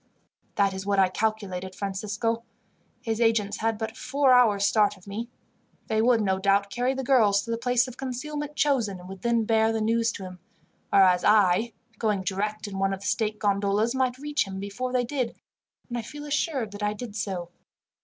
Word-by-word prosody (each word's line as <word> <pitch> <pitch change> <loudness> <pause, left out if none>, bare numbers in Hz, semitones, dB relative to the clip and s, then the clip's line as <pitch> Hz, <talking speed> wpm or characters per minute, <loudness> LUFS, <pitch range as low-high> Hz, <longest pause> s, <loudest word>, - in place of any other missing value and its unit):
"That 200 -1 +2
is 190 0 -5
what 200 0 0
I 190 -1 +5
calculated, 190 -3 -2
Francisco. 210 +3 -2 0.6
His 225 0 -2
agents 225 -3 +2
had 225 0 0
but 220 0 -4
four 275 0 +2
hours' 215 -5 +4
start 205 -1 +3
of 185 - -19
me. 215 +4 -5 0.6
They 220 0 +2
would, 235 -1 +4
no 190 -2 +1
doubt, 200 +1 +2
carry 255 +1 0
the 265 - -3
girls 215 -6 +4
to 230 - -5
the 230 - 0
place 245 +1 +2
of 255 0 -10
concealment 295 +3 -5
chosen, 240 -12 +1
and 180 - -11
would 190 -1 -9
then 235 -1 +2
bear 220 0 +3
the 225 - -1
news 230 +1 +1
to 195 - -7
him; 185 -1 -9 0.5
whereas 185 -2 +5
I, 210 +2 +4 0.3
going 210 -4 0
direct 210 +3 -2
in 195 -1 -5
one 195 0 +1
of 190 - -14
the - - -9
state 215 -1 0
gondolas, 205 +2 +1
might 260 -1 0
reach 290 -4 -1
him 190 0 -6
before 200 +6 -4
they 250 -1 +1
did, 250 -2 -2 0.5
and 240 - -5
I 240 - -1
feel 295 +6 -9
assured 285 -6 -1
that 205 +1 -9
I 210 0 0
did 210 -1 -8
so. 185 -4 -4
220 Hz, 200 wpm, -26 LUFS, 200-240 Hz, 0.6 s, I